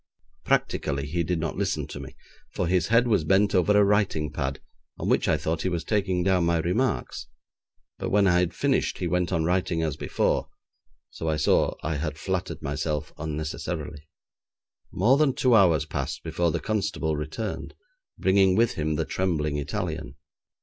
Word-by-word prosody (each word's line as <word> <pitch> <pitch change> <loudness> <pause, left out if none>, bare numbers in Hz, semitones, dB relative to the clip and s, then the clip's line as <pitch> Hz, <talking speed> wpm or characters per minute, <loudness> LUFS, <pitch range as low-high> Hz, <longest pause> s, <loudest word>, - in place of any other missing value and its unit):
Practically 70 0 0
he 85 +4 -1
did 85 +1 -1
not 80 -1 -3
listen - - -1
to - - -8
me, - - -9 0.4
for - - 0
his 90 0 +1
head 115 +2 +4
was 105 -8 +2
bent 95 +5 +3
over 95 +3 +4
a 105 - +6
writing 100 -7 +1
pad 70 -2 -3 0.4
on - - -4
which - - +2
I - - +3
thought 80 0 -2
he 95 - 0
was 85 -2 -2
taking 95 -4 0
down 95 -1 +2
my 85 0 +2
remarks, 95 +9 -1 0.7
but - - -3
when 100 0 +3
I 90 -2 +4
had 90 -1 +1
finished - - 0
he - - -3
went 90 -1 0
on 85 -3 +1
writing 90 -1 0
as 75 -3 -2
before, - - 0 0.6
so 80 - -4
I 80 - 0
saw - - +2
I 80 -1 -1
had 75 +1 -3
flattered 90 -1 -3
myself 75 +1 -3
unnecessarily. 75 0 -5 0.8
More 120 +9 +3
than 140 -4 +3
two 130 -2 +3
hours 90 -9 +5
passed - - -4
before 85 -1 0
the - - -1
constable 100 -7 -1
returned, 80 +8 -5 0.4
bringing 95 0 +4
with 115 +2 +3
him 80 0 -1
the - - -1
trembling 75 -6 -1
Italian. 80 -4 -4
85 Hz, 175 wpm, -26 LUFS, 75-95 Hz, 0.8 s, a